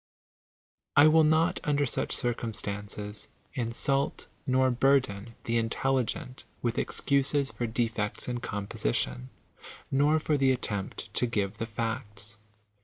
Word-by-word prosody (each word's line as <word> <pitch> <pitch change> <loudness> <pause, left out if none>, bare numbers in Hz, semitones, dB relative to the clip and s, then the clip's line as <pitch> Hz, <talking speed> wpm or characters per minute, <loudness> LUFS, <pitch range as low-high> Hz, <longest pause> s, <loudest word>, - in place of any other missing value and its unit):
I 145 - +8
will 160 +1 +6
not, 160 +2 +3
under 145 -1 +2
such 125 - -1
oirounistanoes, 105 -3 -3 0.3
insult 135 +3 0 0.2
nor 130 0 +3
burden 120 -4 +2
the 115 0 0
intelligent 125 +2 -1 0.2
with 120 -1 0
excuses 140 0 +1
for 120 - -3
defects 110 -2 -1
in 120 -1 -2
composition, 65 - -2 0.6
nor 145 +3 +4
for 150 -1 +1
the 135 -1 +4
attempt 105 -6 -3
to 125 - +2
give 105 -2 -1
the 115 - -2
facts. 110 -2 -4
120 Hz, 115 wpm, -29 LUFS, 105-135 Hz, 0.6 s, I